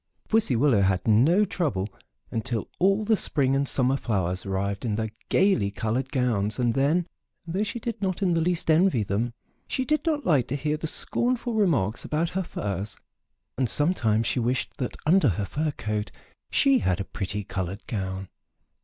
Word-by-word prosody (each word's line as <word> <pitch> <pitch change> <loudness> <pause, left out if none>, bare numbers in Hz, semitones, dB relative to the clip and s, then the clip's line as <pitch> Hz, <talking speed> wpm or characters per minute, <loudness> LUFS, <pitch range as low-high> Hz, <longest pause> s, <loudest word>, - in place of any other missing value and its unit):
Pussy 220 - +2
Willow 120 -4 +4
had 95 0 +1
no 145 - +5
trouble 150 - -1 0.4
until 115 0 -2
all 195 +3 +3
the 220 +1 +4
spring 135 -8 +1
and 140 0 0
summer 130 0 +2
flowers 95 -8 -1
arrived 100 +1 -2
in 110 -4 -1
their 110 0 -2 0.2
gayly 185 - +3
colored 115 +6 -2
gowns 115 -6 0
and 120 -2 +1
then, 150 +7 +2 0.4
though 175 +4 -2
she 215 +3 -2
did 230 -1 -5
not 190 0 -1
in 180 -2 +3
the 165 - +2
least 170 -1 +1
envy 160 - +4
them, 105 +5 -1 0.4
she 260 - -1
did 305 +1 +1
not 305 -3 0
like 140 -8 +3
to 135 - -2
hear 150 +1 -1
the 155 +1 -4
scornful 240 +7 0
remarks 145 - +1
about 160 +2 -1
her 190 - -2
furs, 100 - -4 0.6
and 130 -3 +1
sometimes 115 -9 +2
she - - 0
wished 125 +2 -1
that 125 - -4
under 160 -3 +5
her 100 +1 -1
fur 155 +8 -1
coat 105 -6 -3 0.4
she 275 -2 +4
had 90 -2 0
a - - -1
pretty 100 +3 -3
colored 95 +2 -4
gown. 95 -3 -4
130 Hz, 180 wpm, -26 LUFS, -, 0.6 s, no